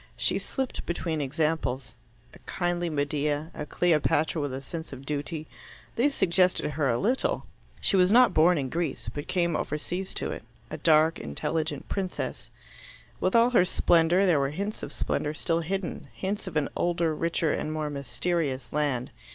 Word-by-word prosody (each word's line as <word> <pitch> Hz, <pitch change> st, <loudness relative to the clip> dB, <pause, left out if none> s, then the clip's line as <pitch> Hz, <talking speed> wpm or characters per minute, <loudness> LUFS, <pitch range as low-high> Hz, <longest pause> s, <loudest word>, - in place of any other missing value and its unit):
She -, -, +2 dB
slipped 265 Hz, -2 st, -3 dB
between 165 Hz, -2 st, -2 dB
examples. 140 Hz, -4 st, -1 dB, 0.4 s
A -, -, -14 dB
kindly 175 Hz, -1 st, -1 dB
Medea, 150 Hz, +1 st, -1 dB
a 150 Hz, -, -6 dB
Cleopatra 160 Hz, -2 st, +2 dB
with 145 Hz, -2 st, -2 dB
a 130 Hz, -, -4 dB
sense 160 Hz, +4 st, -7 dB
of 135 Hz, 0 st, -9 dB
duty 150 Hz, +2 st, -3 dB, 0.5 s
these 275 Hz, +4 st, +2 dB
suggested 180 Hz, -3 st, +2 dB
her 145 Hz, -1 st, 0 dB
a 115 Hz, -, +2 dB
little. 240 Hz, -, +1 dB, 0.3 s
She -, -, +1 dB
was 185 Hz, 0 st, +5 dB
not 250 Hz, +2 st, +6 dB
born 170 Hz, +3 st, +5 dB
in 135 Hz, -3 st, -2 dB
Greece, 170 Hz, +4 st, -3 dB
but 145 Hz, -, -5 dB
came 170 Hz, -3 st, +1 dB
overseas 175 Hz, +6 st, -3 dB
to -, -, -2 dB
it -, -, -5 dB, 0.3 s
a -, -, -4 dB
dark, 160 Hz, 0 st, +4 dB
intelligent 155 Hz, -, -2 dB
princess. 190 Hz, -2 st, -3 dB, 0.7 s
With 185 Hz, -, +1 dB
all 235 Hz, +1 st, +5 dB
her 235 Hz, -, +5 dB
splendour, 175 Hz, +1 st, +3 dB
there 170 Hz, -6 st, +4 dB
were 135 Hz, 0 st, +1 dB
hints 200 Hz, +8 st, -4 dB
of -, -, -6 dB
splendour 150 Hz, +1 st, -2 dB
still 165 Hz, +1 st, 0 dB
hidden 180 Hz, -2 st, -3 dB
hints 200 Hz, +1 st, -3 dB
of 165 Hz, -4 st, -2 dB
an 150 Hz, -, +1 dB
older, 170 Hz, -2 st, +1 dB
richer, 165 Hz, 0 st, 0 dB
and 155 Hz, -, -2 dB
more 155 Hz, -1 st, -2 dB
mysterious 140 Hz, -2 st, -2 dB
land. 140 Hz, -4 st, 0 dB
160 Hz, 170 wpm, -27 LUFS, 145-180 Hz, 0.7 s, not